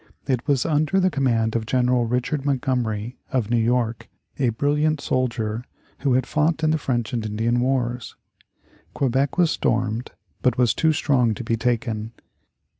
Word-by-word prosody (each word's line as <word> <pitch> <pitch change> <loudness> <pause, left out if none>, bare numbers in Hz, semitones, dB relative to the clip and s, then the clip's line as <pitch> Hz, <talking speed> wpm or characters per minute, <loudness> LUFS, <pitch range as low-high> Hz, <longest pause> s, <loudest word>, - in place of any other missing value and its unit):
It 130 -2 -1
was 140 -4 +2
under 155 +4 +2
the 185 0 +2
command 115 -6 +1
of 110 -1 -1
General 125 -1 +2
Richard 125 +4 -1
Montgomery, 125 -5 -1
of 120 -4 0
New 120 - +3
York, 115 -1 0 0.3
a 130 -3 +3
brilliant 145 +6 +1
soldier 120 -4 -1 0.4
who 135 -2 +1
had 130 0 +2
fought 160 +2 0
in 155 - +3
the 160 - +1
French 120 -5 -2
and 115 -2 -1
Indian 110 +3 0
wars. 125 -2 -1 0.8
Quebec 135 +2 0
was 175 -3 +4
stormed, 120 0 0 0.3
but 125 -3 +2
was 125 -2 +3
too 160 - +2
strong 125 -7 +2
to 120 - -6
be 115 0 0
taken. 115 -2 -2
125 Hz, 160 wpm, -23 LUFS, 115-140 Hz, 0.8 s, was